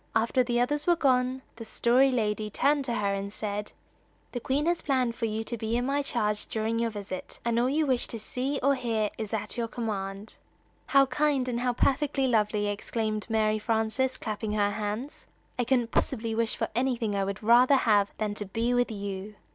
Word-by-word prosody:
After 230 +3 +3
the 240 -1 +1
others 290 +6 0
were 350 - +5
gone, 260 -3 +1
the 230 - -7
Story 245 +4 +3
Lady 215 -4 -1
turned 280 +5 +2
to 240 -2 -1
her 200 -2 0
and 200 0 -3
said: 210 0 -4 0.6
"The 245 - -3
Queen 275 +5 0
has 345 0 +1
planned 255 -4 +1
for 230 - -2
you 220 +1 -2
to 235 +1 -4
be 225 +2 -1
in 245 - 0
my 280 +2 +1
charge 210 -6 -1
during 225 +1 -1
your 230 0 +1
visit, 200 -3 -7
and 235 0 +2
all 245 +2 +2
you 305 +3 +2
wish 255 -3 +1
to 230 - -4
see 255 +6 -3
or 280 +1 +5
hear 225 -5 -1
is 215 -2 -4
at 215 +1 -3
your 235 -1 -1
command." 205 -3 -5 0.5
"How 275 -1 +5
kind, 275 -1 +1
and 240 -1 -1
how 245 0 +1
perfectly 275 +2 +1
lovely!" 210 -4 +2
exclaimed 215 +1 -2
Mary 215 -1 +2
Frances, 225 +4 0
clapping 215 -1 -3
her 205 -1 +2
hands. 215 +6 -4 0.3
"I 245 - +2
couldn't 245 -2 +1
possibly 230 -3 0
wish 230 0 0
for - - -2
anything 235 -3 0
I 195 - +1
would 195 +2 -4
rather 245 +5 +6
have 210 -6 +3
than 210 -1 -1
to 210 0 -4
be 230 +5 0
with 245 0 +2
you!" 200 -1 -5
230 Hz, 205 wpm, -28 LUFS, 210-255 Hz, 0.6 s, rather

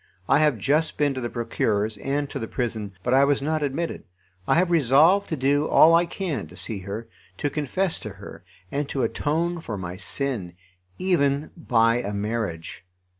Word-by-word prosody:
I - - +4
have 150 -5 +3
just 150 +9 +1
been 145 -2 +2
to 130 - -4
the 120 - -3
Procureur's 110 -3 -1
and 140 +5 -2
to - - -4
the 115 - -4
prison, 110 -5 -3
but 125 - +1
I 135 +1 +6
was 140 0 +3
not 155 +2 -1
admitted. 150 +4 -2 0.4
I - - +4
have 175 +1 +2
resolved 165 +6 +4
to 160 - -1
do 145 +2 +1
all 165 - +6
I 170 +1 +4
can 175 -5 -3
to - - -15
see 110 -4 -2
her, 100 +4 -6 0.3
to 145 - -1
confess 160 +5 -1
to 105 - -7
her, 100 -1 -11 0.3
and 140 0 -2
to 135 - -1
atone 165 +8 -1
for 110 -10 -5
my 90 -1 -6
sin, 105 -3 -3 0.4
even 150 -6 +1
by 115 -7 +2
a 105 -4 -3
marriage. 100 -6 -3
140 Hz, 185 wpm, -24 LUFS, 110-155 Hz, 0.4 s, I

